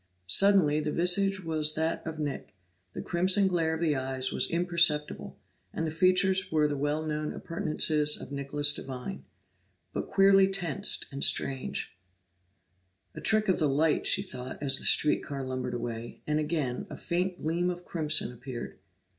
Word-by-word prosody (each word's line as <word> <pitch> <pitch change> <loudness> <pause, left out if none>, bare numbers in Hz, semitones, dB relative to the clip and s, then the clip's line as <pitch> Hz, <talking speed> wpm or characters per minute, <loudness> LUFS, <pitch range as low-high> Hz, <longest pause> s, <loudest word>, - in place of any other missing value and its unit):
Suddenly 160 - +4
the 150 0 -2
visage 190 +3 +2
was 155 -2 +2
that 160 +1 -1
of 160 -1 -5
Nick; 145 -9 -5 0.4
the - - -6
crimson 185 +3 +3
glare 165 -3 0
of 160 - -6
the 155 -3 +1
eyes 130 0 -1
was - - 0
imperceptible, 170 -3 +1 0.3
and 165 - -3
the 160 - -3
features 185 +3 +2
were 150 -1 +2
the 145 - -3
well 145 +3 -2
known 150 0 -3
appurtenances 155 -2 0
of - - -10
Nicholas 145 +1 +1
Devine, 125 - -7 0.7
but - - -4
queerly 195 0 +5
tensed 180 -7 -1
and 140 0 -2
strained. 135 -1 0 1.4
"A - - -9
trick 215 -1 +2
of 185 - +1
the 155 -3 +2
light," 150 +3 +1
she 195 - +4
thought, 130 -8 -8
as 135 -2 +1
the - - -5
street 150 - +3
car 140 -2 -6
lumbered 130 -1 -4
away, 115 -1 -6
and 150 0 0
again 150 -5 -2
a - - -8
faint 180 +1 -2
gleam 170 +3 -1
of 175 0 -6
crimson 155 -6 +1
appeared. 125 0 -8
155 Hz, 165 wpm, -28 LUFS, 140-175 Hz, 1.4 s, queerly